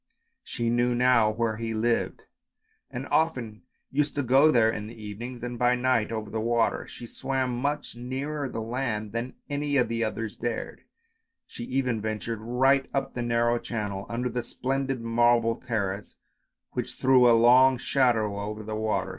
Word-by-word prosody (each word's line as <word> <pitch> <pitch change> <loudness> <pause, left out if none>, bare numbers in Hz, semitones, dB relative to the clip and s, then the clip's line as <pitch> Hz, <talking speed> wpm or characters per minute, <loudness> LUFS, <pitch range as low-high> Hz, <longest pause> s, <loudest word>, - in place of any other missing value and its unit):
She 115 -1 -2
knew 120 +1 +2
now 120 -3 +4
where 110 0 -1
he 115 0 -3
lived 115 +2 0 0.7
and 125 +2 -5
often 125 -10 0 0.3
used 145 +1 0
to 145 - 0
go 135 +5 +5
there 115 -6 +4
in 105 -1 -5
the 115 +1 -11
evenings 115 +4 -7
and 120 -1 -5
by 125 0 +4
night 125 -3 +1
over 110 -2 -4
the 110 - -2
water; 115 0 +1
she 120 - -10
swam 130 0 -2
much 140 +3 -2
nearer 135 +4 -4
the 115 - -4
land 115 -3 -3
than 115 +3 -4
any 145 -1 -1
of 125 - +2
the 115 0 -1
others 110 0 -3
dared, 120 -1 -4 0.6
she 120 - -8
even 125 -4 -1
ventured 110 +1 -3
right 130 +4 +2
up 135 0 -1
the 120 - -3
narrow 120 0 +1
channel 100 -5 -4
under 120 +2 -2
the 125 0 -2
splendid 135 +1 -2
marble 115 0 +3
terrace 100 -5 -3 0.6
which - - -4
threw 130 -2 +5
a 115 - +6
long 125 +3 +6
shadow 115 -6 +1
over 105 +1 -5
the 110 0 -5
water. 110 -3 -1
120 Hz, 170 wpm, -27 LUFS, 110-130 Hz, 0.7 s, a